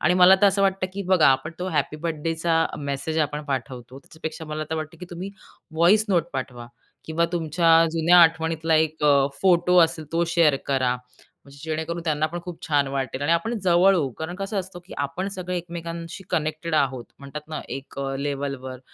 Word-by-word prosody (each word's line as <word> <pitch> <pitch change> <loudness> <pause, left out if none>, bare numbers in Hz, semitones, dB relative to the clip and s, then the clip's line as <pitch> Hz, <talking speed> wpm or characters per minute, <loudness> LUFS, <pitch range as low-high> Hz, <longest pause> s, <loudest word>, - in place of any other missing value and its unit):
आणि 180 - +3
मला 180 +1 +7
तर 205 - +6
असं 195 0 +2
वाटतं, 190 -1 +1
की 200 - -4
बघा 185 -3 +4
आपण 135 +3 +1
तो 180 +1 -3
हॅपी 155 -3 -1
बर्थडेचा 165 0 0
मेसेज 140 +2 -3
आपण 150 -1 -1
पाठवतो, 130 -1 -5
त्यापेक्षा 160 +2 -8
मला 155 0 -4
तर - - 0
वाटतं, 155 +1 -6
की 180 - -8
तुम्ही 180 +3 -6 0.4
व्हॉईस 180 +7 +4
नोट 175 -4 +1
पाठवा 125 -2 -5 0.4
किंवा 160 +1 0
तुमच्या 165 0 +3
जुन्या 170 +2 +5
आठवणीतला 160 0 +2
एक 155 -1 +1
अ, 140 -2 +5
फोटो 175 -3 +4
तो 180 0 +5
असेल 160 -1 -5
तो 170 +1 +2
शेअर 165 -4 +3
करा. 130 -3 +1 0.5
म्हणजे 140 0 -15
जेणेकरून 160 +2 -3
त्यांना 155 -1 +1
पण 175 +2 -6
खूप 175 -2 -7
छान 145 -2 +2
वाटेल 135 0 -3
आणि 160 +3 +2
आपण 225 +8 0
जवळ 185 +2 +5
होऊ. 145 -7 0
कारण 160 +2 -5
कसं 195 +1 -3
असतं, 185 -1 -6
की 185 - -13
आपण 145 +7 -2
सगळे 180 -1 -4
एकमेकांशी 170 +1 -6
कनेक्टेड 155 +1 -2
आहोत 130 -5 +1
म्हणतात 150 +2 -9
ना 155 - -4
एक 135 0 -8
अ, 135 0 -2
लेव्हलवर 140 -2 -4
160 Hz, 190 wpm, -24 LUFS, 145-175 Hz, 0.5 s, मला